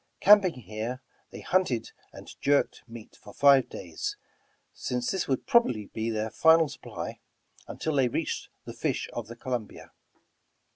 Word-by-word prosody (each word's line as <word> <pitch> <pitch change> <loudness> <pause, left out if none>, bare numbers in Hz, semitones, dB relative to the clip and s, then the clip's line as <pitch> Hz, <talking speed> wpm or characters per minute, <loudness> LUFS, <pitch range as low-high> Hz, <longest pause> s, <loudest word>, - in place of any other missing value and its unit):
Camping 200 -4 +6
here, 110 +5 -5 0.3
they - - -10
hunted 180 -12 0 0.2
and - - -12
jerked 140 0 +2
meat 115 -2 -11
for 105 - -15
five 140 -2 +5
days, 85 -3 -5 0.6
since 125 -1 -2
this 190 -2 -2
would 135 - -1
probably 230 - +2
be 110 +1 -2
their 110 0 -2
final 160 0 +5
supply - - -7 0.5
until 160 - -3
they 135 -3 +3
reached 120 - -3 0.2
the - - -7
fish - - -2
of 120 -3 -5
the 120 - -9
Colum 120 -2 -3
bia. - - -14
125 Hz, 150 wpm, -28 LUFS, 110-160 Hz, 0.6 s, Camping